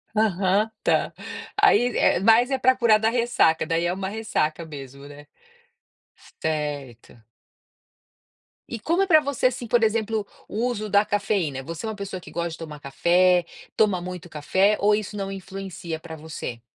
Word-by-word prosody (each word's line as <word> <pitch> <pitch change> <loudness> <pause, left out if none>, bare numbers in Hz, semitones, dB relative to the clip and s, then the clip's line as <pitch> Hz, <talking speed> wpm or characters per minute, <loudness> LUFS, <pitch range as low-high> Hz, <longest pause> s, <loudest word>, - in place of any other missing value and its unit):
Aham, 205 0 +2
tá. - - +1 0.5
Aí 245 - +4
é - - +3
mais 225 +5 +5
é 265 - +1
pra 260 0 +4
curar 230 -4 +4
da 220 +1 +2
ressaca, 235 -10 +2
daí 165 +2 0
é 175 - 0
uma 190 0 -4
ressaca 170 -7 -2
mesmo, 140 -2 -10
né. 145 +1 -12 1.1
Certo. 145 -7 -4 1.5
E 230 - -5
como 340 +7 +1
é 390 - +2
pra 315 -3 +6
você, 280 -3 -2
assim, 245 -1 -4
por 240 +1 +3
exemplo 220 -1 0 0.2
o 225 +4 -2
uso 215 -3 -3
da 200 +1 +4
cafeína? 195 -10 -1
Você 165 +7 -6
é - - -2
uma 220 - -5
pessoa 200 -2 -6
que - - -13
gosta 170 0 -2
de 160 - -8
tomar 155 -3 -8
café, 175 +5 +3 0.3
toma 205 -5 +3
muito 180 -1 -7
café 190 +8 +2
ou 210 +1 +4
isso 210 0 -2
não 195 -1 -4
influencia 190 -3 -6
pra 160 -1 -9
você? 150 -6 -7
195 Hz, 170 wpm, -24 LUFS, 160-220 Hz, 1.5 s, pra